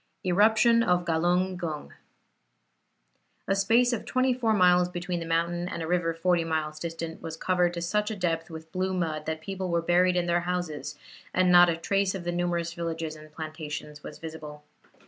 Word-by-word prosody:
ERUPTION 220 +5 +4
OF 180 -4 +2
GALUNG 175 +3 +1
GUNG 160 -4 -5 1.5
A 195 - +2
space 235 +5 +3
of 230 - -2
twenty 255 0 +1
four 240 -3 0
miles 180 -3 +4
between 175 0 -3
the 165 - -6
mountain 170 +1 0
and 170 - -4
a - - -4
river 175 -1 +1
forty 175 0 +2
miles 155 -1 -2
distant 165 0 -5
was 160 0 -6
covered 180 0 +1
to 170 - -3
such 210 +5 0
a 220 - -3
depth 165 -3 -1
with 160 -1 -10
blue 185 +1 -1
mud, 155 -4 -2
that 160 0 -3
people 190 +2 -4
were 170 0 +2
buried 180 +2 +3
in 175 -1 +1
their 175 0 +2
houses, 155 -5 -3 0.4
and 185 -1 +4
not 175 0 +8
a 165 - 0
trace 195 +3 0
of 185 - -5
the 175 - -2
numerous 175 -1 -1
villages 165 -2 -4
and 155 0 -14
plantations 150 -1 -7
was - - -9
visible. 155 -2 -9
175 Hz, 185 wpm, -27 LUFS, 160-185 Hz, 1.5 s, not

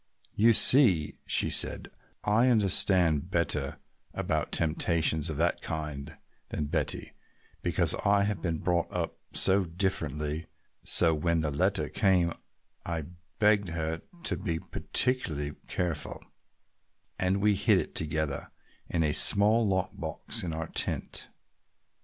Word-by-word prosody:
"You 115 +3 +4
see," 105 - +4
she - - +1
said, - - 0 0.3
"I 110 +4 +2
understand 95 - +3
better 75 -6 -1 0.4
about 80 -1 -2
temptations 80 -1 +1
of 75 - -4
that 85 +2 0
kind 75 -3 -6 0.3
than 75 - -3
Betty, - - -2 0.5
because - - +1
I 100 0 +3
have 100 -4 -2
been 85 -3 -2
brought 85 +1 -1
up 85 -2 -4
so 95 +1 +4
differently, 80 -4 -3 0.4
so 80 -1 +5
when 80 +1 0
the 75 -2 -2
letter 70 - 0
came 90 -4 +1 0.5
I 80 -3 -5 0.3
begged 105 -2 +3
her 80 0 -3 0.2
to - - 0
be 85 -4 -3
particularly 80 - -1
careful, 85 -5 -4 1.0
and 95 +1 +1
we 105 +1 +3
hid 100 0 +2
it - - -3
together 80 -2 -1 0.4
in 85 -2 0
a 75 -1 0
small 105 +6 +5
lock 95 -1 -1
box - - -4
in 85 - -4
our 80 0 -5
tent. - - -1
85 Hz, 130 wpm, -28 LUFS, 80-100 Hz, 1.0 s, so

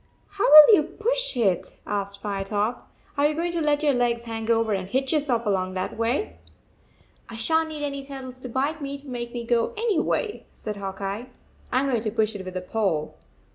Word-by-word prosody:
"How 405 0 0
will 305 +8 +11
you - - +3
push 455 - -1
it?" 195 -7 0
asked 200 -1 -3
Firetop. 205 +3 -2 0.3
"Are 290 - +5
you 300 - -2
going 340 +2 -1
to 340 -1 -2
let 295 -1 +1
your 290 -2 +4
legs 240 -1 +1
hang 225 -1 -5
over 225 -2 +2
and 190 -2 -2
hitch 265 +5 0
yourself 265 -6 0
along 185 -2 0
that 185 - -3
way?" 235 - -1 0.5
" - - -33
I 230 - -8
shan 320 +8 +1
t 310 - -6
need 295 - -2
any 280 -1 -4
turtles 265 -2 -8
to 255 - -7
bite 280 +6 -1
me 280 0 -4
to 280 +1 -16
make 240 -2 -5
me 235 -1 -5
go 235 -1 +1
anyway," 435 0 0
said 210 -1 -6
Hawk 195 0 -6
Eye. 200 +6 -4 0.4
41 - - -28
I 255 - +4
m 275 - 0
going 240 -5 +1
to 215 - -1
push 220 0 0
it 195 - -5
with 185 0 -6
a - - -3
pole." 180 -6 -1
240 Hz, 220 wpm, -25 LUFS, 210-290 Hz, 0.5 s, will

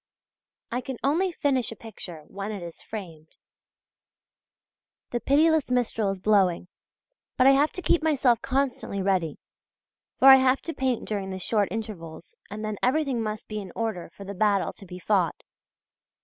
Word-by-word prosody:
I 245 +2 -1
can 260 0 -6
only 335 +7 +2
finish 275 -8 0
a - - -7
picture 185 -8 -10
when 200 +2 -6
it 200 -4 -6
is 170 -1 -9
framed. 165 -8 -9 1.7
The 240 - -1
pitiless 305 +4 +3
Mistral 235 -4 0
is 195 -1 -3
blowing! 185 -3 +2 0.7
but 255 - +4
I 270 - +8
have 285 +3 +3
to 365 - -5
keep 340 - +3
myself 270 -7 +2
constantly 265 -6 -1
ready; 185 -6 0 0.8
for 265 - +5
I 265 - +11
have 260 0 +2
to 330 - -4
paint 260 -5 -1
during 200 -3 -3
the 190 - -4
short 205 +2 +1
intervals 215 - -7
and 215 +1 -5
then 215 -1 -3
everything 265 -2 +1
must 215 -1 -4
be 215 -1 -4
in 190 -3 -8
order 220 -8 -3
for 200 - -11
the 200 +1 -6
battle 200 0 +1
to 195 - -14
be 180 0 -8
fought. 185 -1 0
220 Hz, 165 wpm, -26 LUFS, 195-265 Hz, 1.7 s, I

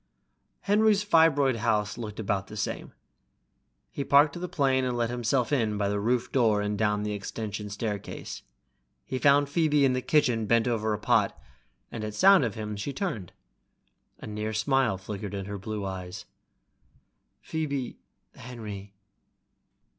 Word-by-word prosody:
Henry's 210 0 +3
fibroid 155 - +4
house 105 -2 0
looked 110 -3 -7
about 100 -2 -1
the 105 - -9
same. 100 - -3 1.0
He 140 - -3
parked 145 +2 +5
the 180 - -2
plane 135 -5 +2
and 125 -1 -1
let 120 0 0
himself 125 +2 0
in 110 -6 +1
by 100 -1 0
the 100 0 -1
roof 120 +3 0
door 115 -5 +3
and 105 0 -1
down 105 0 +1
the 105 - -2
extension 105 +1 -5
staircase. 105 -1 -5 0.6
He 130 - -3
found 140 +2 +4
Phoebe 150 -1 +3
in 130 - +3
the 130 - -1
kitchen 120 -7 +2
bent 115 +2 +3
over 110 -2 0
a - - -5
pot, 105 - +1 0.5
and 110 - -5
at 105 -1 -5
sound 195 - +6
of 115 -4 -2
him 105 -1 -4
she 105 +8 -4
turned. 125 - -4 0.9
A - - -10
near 105 +1 -4
smile 125 -1 +1
flickered 100 +1 -6
in 100 -1 -4
her 100 0 -6
blue 105 +1 -4
eyes. 95 -1 -6 1.1
"Phoebe 140 -5 -3 0.2
..." - - -49
"Henry 105 -5 -9
115 Hz, 155 wpm, -27 LUFS, 105-135 Hz, 1.1 s, sound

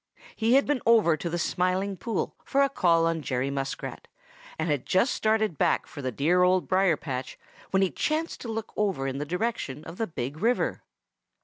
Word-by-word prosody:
He 230 +3 +3
had 275 - +5
been 285 -4 0
over 220 -8 +5
to 170 - -4
the 175 - -2
Smiling 185 +4 0
Pool 215 +3 -3
for 275 0 +2
a 275 - +2
call 170 -9 +3
on 165 -1 0
Jerry 135 -1 -1
Muskrat 135 -1 -5 0.5
and - - -1
had 145 -5 0
just 190 +8 +2
started 215 -7 +1
back - - +2
for 145 - -9
the 130 -1 -2
dear 165 +10 +2
Old 180 0 +3
Briar 185 -4 +3
patch 130 -3 -5 0.3
when 190 0 +3
he 190 - +1
chanced 315 +2 -2
to - - -6
look 225 -1 -4
over 195 -10 0
in 135 0 -3
the 145 - -2
direction 180 - -2
of 165 +2 -9
the 225 - -1
Big 140 -3 -5
River. 240 +5 +1
180 Hz, 200 wpm, -27 LUFS, 150-220 Hz, 0.5 s, had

